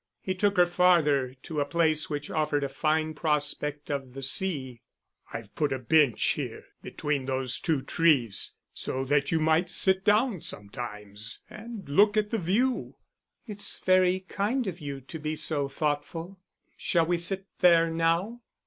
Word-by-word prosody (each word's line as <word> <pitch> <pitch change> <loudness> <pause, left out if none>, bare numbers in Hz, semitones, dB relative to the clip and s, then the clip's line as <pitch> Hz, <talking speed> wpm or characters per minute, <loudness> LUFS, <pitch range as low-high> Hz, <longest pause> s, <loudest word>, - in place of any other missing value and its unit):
He 185 - -3
took 200 +1 0
her 180 - +7
farther, 165 -7 +3
to 155 -2 -4
a 145 - +1
place 155 0 +1
which 145 -1 -4
offered 150 -2 0
a 140 - -2
fine 155 +2 0
prospect 150 -1 -1
of 135 -3 -4
the 135 - -6
sea. 135 -6 0 0.5
"I've 115 -3 -8
put 150 -3 0
a 135 - 0
bench 135 -1 +3
here, - - -3 0.2
between 145 -3 -3
those 130 -1 0
two 155 -6 0
trees, 135 - +2 0.2
so 130 +1 -2
that 140 0 +1
you 165 - +2
might 160 +3 +2
sit 190 0 +3
down 210 - +2
sometimes, 105 0 -6
and 220 -3 -9
look 205 +9 +4
at 210 -1 +1
the 225 - 0
view." 225 +9 0 0.5
"It's 205 -3 -3
very 185 0 +3
kind 210 +7 -2
of 185 -3 -5
you 140 -3 -6
to 160 +5 -8
be 155 +1 -3
so 150 -2 -1
thoughtful. 155 +6 -3 0.4
Shall 165 -2 +1
we 175 +1 +1
sit 190 +3 -1
there 165 -2 +5
now?" 165 +8 0
155 Hz, 160 wpm, -27 LUFS, 140-185 Hz, 0.5 s, her